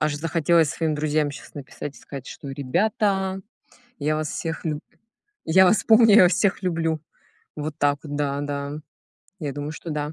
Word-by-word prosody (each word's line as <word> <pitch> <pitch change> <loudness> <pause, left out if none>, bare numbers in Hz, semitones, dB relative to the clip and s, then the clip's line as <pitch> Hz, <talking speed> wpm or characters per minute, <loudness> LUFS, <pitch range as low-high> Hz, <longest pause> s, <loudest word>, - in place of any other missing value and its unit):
Аж 150 -1 0
захотелось 165 0 +2
своим 160 -2 -1
друзьям 150 0 0
щас 140 - -11
написать 145 0 -7
и - - -13
сказать: 135 -3 -9
"Ребята, 190 - 0 0.6
я 155 +1 0
вас 155 -1 -2
всех 165 +2 -4
лю 155 -2 -2 0.7
я 190 +4 +6
вас 200 +3 +3
помню, 225 -2 +6
я 215 - +9
вас 180 +1 +5
всех 195 +2 +1
люблю!". 165 -3 0 0.6
Вот 150 0 -4
так 145 0 +2
вот, 145 -2 -5
да, 145 -1 -1
да, 145 0 -4 0.7
я 145 -3 -3
думаю, 145 +2 -5
что 165 +1 -8
да. 150 0 -3
155 Hz, 170 wpm, -24 LUFS, 145-175 Hz, 0.7 s, я